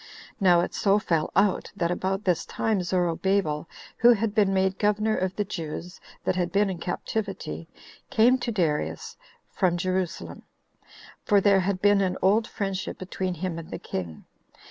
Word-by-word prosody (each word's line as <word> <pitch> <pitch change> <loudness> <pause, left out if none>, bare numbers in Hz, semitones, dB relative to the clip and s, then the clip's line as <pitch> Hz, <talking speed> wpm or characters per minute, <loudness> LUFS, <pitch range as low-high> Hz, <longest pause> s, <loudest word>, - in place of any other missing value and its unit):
Now 180 -4 +5
it 175 - -3
so 200 0 +3
fell 165 -7 0
out, 195 -1 +2
that 175 -4 0
about 190 +3 -1
this 180 -5 +1
time 215 -4 -1
Zorobabel, 175 -2 0 0.3
who 240 +1 +7
had 220 -1 -1
been 205 -3 +3
made 190 0 +1
governor 215 +1 +2
of 185 0 -2
the 210 - -1
Jews 175 -1 -6 0.2
that - - 0
had 180 -1 -1
been 200 0 +2
in 180 - -6
captivity, 180 - -4 0.4
came 245 +4 +4
to 245 - -2
Darius, 165 -8 -1 0.4
from 180 -3 +1
Jerusalem; 185 0 -3 0.8
for 205 -2 +4
there 195 0 +4
had 185 0 -1
been 205 -1 +5
an 185 -2 0
old 215 +4 +3
friendship 195 -2 -4
between 185 0 -3
him 170 0 -3
and 165 - -10
the - - -5
king. 85 -4 -6
190 Hz, 165 wpm, -26 LUFS, 175-205 Hz, 0.8 s, who